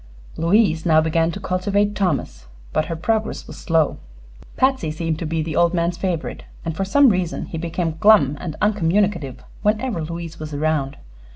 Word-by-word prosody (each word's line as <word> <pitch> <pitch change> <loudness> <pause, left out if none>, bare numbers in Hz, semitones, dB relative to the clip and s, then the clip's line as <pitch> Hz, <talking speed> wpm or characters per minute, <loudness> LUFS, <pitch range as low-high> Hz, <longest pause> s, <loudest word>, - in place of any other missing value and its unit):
Louise 170 -1 +2
now 160 -3 +5
began 165 +1 +2
to 195 - -6
cultivate 200 +2 0
Thomas, 140 - -2 0.3
but 155 - +1
her 165 - -4
progress 220 +6 -1
was - - -10
slow. 165 -3 +1 0.6
Patsy 260 - +2
seemed 160 0 -2
to 165 - -3
be 160 0 -1
the 160 -1 -4
old 170 +1 +3
man's 170 +1 0
favorite, 175 -3 -3 0.2
and 165 -1 -3
for 195 - -1
some 280 +7 +5
reason 185 -4 -1
he 165 - -6
became 165 -1 -2
glum 160 -10 +5
and 160 -4 -5
uncommunicative 190 - +1 0.2
whenever 215 -2 0
Louise 165 0 -6
was 155 -1 -6
around. 145 -2 -1
170 Hz, 170 wpm, -21 LUFS, 160-195 Hz, 0.6 s, now